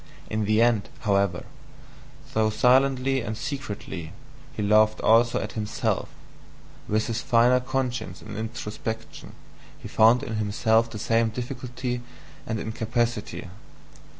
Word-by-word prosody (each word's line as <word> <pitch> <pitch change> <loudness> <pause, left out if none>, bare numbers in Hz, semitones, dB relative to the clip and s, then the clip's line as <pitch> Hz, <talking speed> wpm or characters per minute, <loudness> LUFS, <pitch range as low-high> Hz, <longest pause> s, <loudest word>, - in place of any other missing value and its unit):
In 110 0 0
the 110 +2 +4
end, 115 -5 +2
however, 100 -5 +1 0.9
though 110 -3 +3
silently 130 +3 +3
and 110 -1 -4
secretly, 105 - -5 0.4
he 110 -6 -4
laughed 110 +1 +4
also 115 +2 +4
at - - -4
himself: 105 -2 -2 0.8
with 110 +1 +1
his 115 0 -2
finer 125 +1 +4
conscience 130 -1 -3
and 105 -1 -9
introspection, 110 0 -6 0.4
he - - -9
found 115 +4 +5
in 110 -5 -3
himself 110 +2 +2
the 110 - -7
same 115 +2 +2
difficulty 125 +1 -4 0.5
and 110 -1 -2
incapacity. 115 0 -2
115 Hz, 120 wpm, -25 LUFS, 110-125 Hz, 0.9 s, found